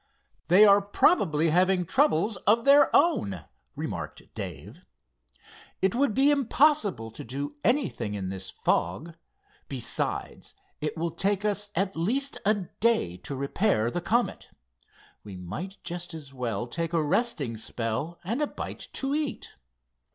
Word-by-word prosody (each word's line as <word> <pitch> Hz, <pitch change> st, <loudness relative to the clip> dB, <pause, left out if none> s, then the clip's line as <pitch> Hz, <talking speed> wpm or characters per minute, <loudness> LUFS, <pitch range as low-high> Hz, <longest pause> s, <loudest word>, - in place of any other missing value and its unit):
"They 190 Hz, +5 st, +7 dB
are 200 Hz, 0 st, +6 dB
probably 185 Hz, -, +3 dB
having 180 Hz, +1 st, +3 dB
troubles 215 Hz, -, +2 dB
of 230 Hz, +4 st, +4 dB
their 280 Hz, +1 st, +7 dB
own," 100 Hz, -, +2 dB, 0.3 s
remarked -, -, -5 dB
Dave. 105 Hz, -, -8 dB, 1.0 s
"It 190 Hz, -1 st, +1 dB
would 260 Hz, -3 st, +1 dB
be 275 Hz, +3 st, +5 dB
impossible 260 Hz, -, +2 dB
to -, -, -9 dB
do 140 Hz, +4 st, -5 dB
anything 180 Hz, -, 0 dB
in 95 Hz, -2 st, -4 dB
this 95 Hz, 0 st, -6 dB
fog. 145 Hz, -, -1 dB, 0.5 s
Besides, -, -, -4 dB, 0.2 s
it 150 Hz, +2 st, -3 dB
will 165 Hz, +1 st, -1 dB
take 195 Hz, +4 st, 0 dB
us 205 Hz, 0 st, 0 dB
at 195 Hz, +2 st, 0 dB
least 255 Hz, -, -1 dB
a 215 Hz, -, +5 dB, 0.2 s
day 220 Hz, -, +2 dB
to 135 Hz, +9 st, -6 dB
repair 140 Hz, -, +1 dB
the 175 Hz, -, -2 dB
Comet. 235 Hz, +7 st, 0 dB, 0.7 s
We 100 Hz, -2 st, -9 dB
might 95 Hz, -, -7 dB
just 175 Hz, 0 st, -5 dB
as 145 Hz, -4 st, -10 dB
well 120 Hz, -4 st, -3 dB
take 165 Hz, +6 st, -4 dB
a 165 Hz, -2 st, +2 dB
resting 145 Hz, -, 0 dB
spell 115 Hz, +8 st, -4 dB
and 230 Hz, -, -2 dB
a 300 Hz, -, +1 dB
bite -, -, -7 dB
to 270 Hz, +1 st, -1 dB
eat." 300 Hz, -2 st, -3 dB
175 Hz, 140 wpm, -27 LUFS, -, 1.0 s, They